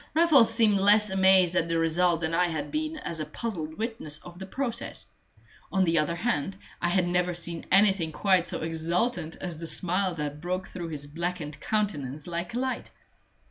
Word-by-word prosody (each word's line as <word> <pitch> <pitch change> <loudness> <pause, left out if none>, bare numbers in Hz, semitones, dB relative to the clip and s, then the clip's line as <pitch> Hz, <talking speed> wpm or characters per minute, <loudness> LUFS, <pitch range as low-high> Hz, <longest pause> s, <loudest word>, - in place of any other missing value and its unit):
Raffles 310 -9 +6
seemed 220 -3 +4
less 210 +1 +5
amazed 190 -2 +5
at 165 - +2
the 165 0 0
result 165 +1 +2
than 160 0 -1
I 180 +1 +3
had 160 -3 -4
been 310 +1 -2
as 170 - -5
a 155 - -2
puzzled 160 -3 -5
witness 220 -10 -3
of 175 0 -12
the 190 - -7
process; 240 +2 -3 0.7
on 190 -1 +2
the 165 -2 +2
other 150 +3 0
hand, 190 -2 -2 0.2
I 175 - +1
had 180 0 +2
never 180 0 0
seen 170 -1 -5
anything 195 -4 +4
quite 185 +1 +2
so - - -3
exultant 165 +3 -1
as 175 -4 -6
the 165 - -6
smile 180 +3 +1
that 150 -1 -5
broke 185 +2 -3
through 175 -2 -6
his 145 -2 -6
blackened 160 -1 -5
countenance 150 - -2
like 175 +4 -4
a - - 0
light. 260 0 -3
175 Hz, 185 wpm, -27 LUFS, 165-200 Hz, 0.7 s, Raffles